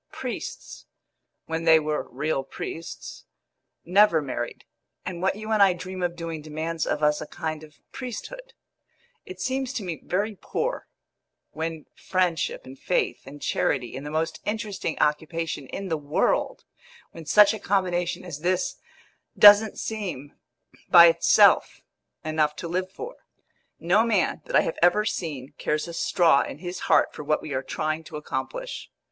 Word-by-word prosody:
Priests -, -, -7 dB, 0.6 s
when 160 Hz, 0 st, -3 dB
they 160 Hz, -1 st, +7 dB
were 155 Hz, 0 st, -3 dB
real 140 Hz, +1 st, -2 dB
priests 165 Hz, +4 st, -8 dB, 0.6 s
never 185 Hz, -1 st, +5 dB
married, 130 Hz, -4 st, -5 dB, 0.4 s
and 175 Hz, -2 st, -5 dB
what 190 Hz, +1 st, +1 dB
you 215 Hz, +1 st, -6 dB
and 215 Hz, -2 st, +3 dB
I 195 Hz, -2 st, +6 dB
dream 185 Hz, +1 st, -7 dB
of 175 Hz, -1 st, -1 dB
doing 165 Hz, -2 st, -5 dB
demands 155 Hz, +2 st, -3 dB
of 150 Hz, -, -1 dB
us 150 Hz, 0 st, +3 dB
a 155 Hz, -, -6 dB
kind 160 Hz, -2 st, -5 dB
of 150 Hz, -1 st, -15 dB
priesthood. -, -, -7 dB, 0.7 s
It 375 Hz, -, -9 dB
seems 260 Hz, 0 st, -2 dB
to 225 Hz, -, -3 dB
me 165 Hz, -6 st, -5 dB
very 205 Hz, +4 st, -1 dB
poor, -, -, -3 dB, 0.6 s
when 160 Hz, -1 st, -4 dB
friendship 180 Hz, -4 st, -1 dB
and 130 Hz, +1 st, -12 dB
faith 180 Hz, -, -1 dB
and 145 Hz, +1 st, -10 dB
charity 125 Hz, -4 st, 0 dB
and 135 Hz, -, -6 dB
the 150 Hz, -, -6 dB
most 160 Hz, +1 st, -2 dB
interesting 210 Hz, -6 st, -3 dB
occupation 155 Hz, -1 st, -1 dB
in 195 Hz, +6 st, -6 dB
the 160 Hz, -, 0 dB
world 145 Hz, +1 st, 0 dB, 0.5 s
when 165 Hz, -2 st, -11 dB
such 210 Hz, +3 st, +6 dB
a 220 Hz, -, -5 dB
combination 180 Hz, -3 st, -1 dB
as 145 Hz, -, -6 dB
this 180 Hz, +3 st, 0 dB, 0.6 s
doesn't 205 Hz, +1 st, +8 dB
seem, 185 Hz, -11 st, -5 dB, 0.6 s
by 170 Hz, -1 st, +10 dB
itself, 165 Hz, -, +4 dB, 0.4 s
enough 155 Hz, -1 st, +1 dB
to 170 Hz, -, -6 dB
live 185 Hz, +2 st, -2 dB
for. 475 Hz, -, -8 dB, 0.6 s
No 180 Hz, +6 st, +3 dB
man 215 Hz, -6 st, +1 dB
that -, -, -3 dB
I -, -, +7 dB
have -, -, -3 dB
ever 175 Hz, +5 st, +4 dB
seen 155 Hz, -, -4 dB
cares 150 Hz, +2 st, -1 dB
a 170 Hz, -, -7 dB
straw 165 Hz, -4 st, +3 dB
in -, -, -5 dB
his 175 Hz, +2 st, -6 dB
heart -, -, +4 dB
for -, -, -7 dB
what 155 Hz, +1 st, 0 dB
we 150 Hz, -, -5 dB
are 130 Hz, -, -1 dB
trying 155 Hz, +3 st, -3 dB
to 150 Hz, -, -7 dB
accomplish. -, -, -5 dB
165 Hz, 160 wpm, -25 LUFS, 155-195 Hz, 0.7 s, by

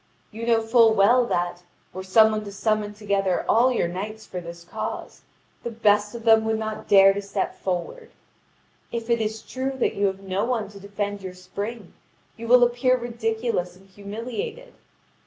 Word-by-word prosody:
You 225 Hz, +2 st, -6 dB
know 225 Hz, -1 st, +3 dB
full 225 Hz, -1 st, +5 dB
well 235 Hz, +5 st, +4 dB
that, 175 Hz, -2 st, -2 dB, 0.3 s
were 185 Hz, -, -5 dB
some 220 Hz, +4 st, +5 dB
one 215 Hz, 0 st, -2 dB
to 200 Hz, -, -7 dB
summon 210 Hz, 0 st, -1 dB
together 200 Hz, -3 st, 0 dB
all 245 Hz, +3 st, +4 dB
your 240 Hz, -, +1 dB
knights 210 Hz, +5 st, -6 dB
for 180 Hz, -, -6 dB
this 170 Hz, 0 st, -10 dB
cause, 170 Hz, -, -6 dB, 0.4 s
the -, -, -4 dB
best 210 Hz, -1 st, +2 dB
of 235 Hz, -, -7 dB
them 225 Hz, -1 st, +5 dB
would 220 Hz, 0 st, 0 dB
not 220 Hz, 0 st, -5 dB
dare 195 Hz, -1 st, +7 dB
to 200 Hz, -, -3 dB
step 200 Hz, -1 st, -3 dB
forward. 195 Hz, -, -4 dB, 0.8 s
If 235 Hz, 0 st, -3 dB
it 235 Hz, -1 st, +2 dB
is 220 Hz, 0 st, -3 dB
true 265 Hz, +1 st, -3 dB
that 255 Hz, -, +1 dB
you 200 Hz, 0 st, +1 dB
have 195 Hz, 0 st, -4 dB
no 190 Hz, 0 st, -2 dB
one 230 Hz, -5 st, -1 dB
to 200 Hz, -1 st, -12 dB
defend 200 Hz, 0 st, -4 dB
your 185 Hz, -1 st, -7 dB
spring, 200 Hz, +3 st, -7 dB, 0.4 s
you 230 Hz, 0 st, -8 dB
will 245 Hz, +1 st, +7 dB
appear 245 Hz, +1 st, +2 dB
ridiculous 225 Hz, -6 st, -2 dB
and 190 Hz, +1 st, -20 dB
humiliated. 250 Hz, -, -6 dB
215 Hz, 180 wpm, -24 LUFS, 195-235 Hz, 0.8 s, dare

